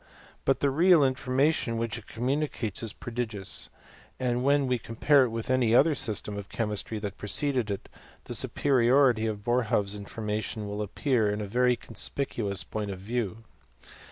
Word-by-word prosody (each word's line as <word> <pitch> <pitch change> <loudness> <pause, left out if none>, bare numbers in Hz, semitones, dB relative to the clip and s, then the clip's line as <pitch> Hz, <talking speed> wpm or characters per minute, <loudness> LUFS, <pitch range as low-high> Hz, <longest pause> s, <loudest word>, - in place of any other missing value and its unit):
But 135 - +2
the 140 - +2
real 170 +3 +5
informa 130 +3 +2
tion 115 -7 -2
which 115 0 -2
it 110 - -18
communicates 125 -3 -2
is 115 -2 +1
prodigious, 115 -5 0 0.5
and 125 -1 0
when 140 +1 +3
we 125 -2 0
compare 130 +5 +3
it - - -3
with 115 +2 -4
any 120 -3 +3
other 155 +5 +5
system 110 -6 -1
of 100 - -9
chemistry 105 0 -2
that 105 -2 -6
preceded 125 +2 0
it, 100 - -4 0.4
the - - -6
superiority 125 -3 +3
of 105 -2 -4
Boerhaave's 115 -4 +1
information 105 +1 -4
will 105 +1 -4
appear 110 +1 0
in 105 +1 -2
a 105 - -3
very 125 +4 +2
conspicuous 110 -5 -3
point 105 +4 -4
of 95 - -5
view. 110 +1 -3
115 Hz, 160 wpm, -28 LUFS, 105-130 Hz, 0.5 s, real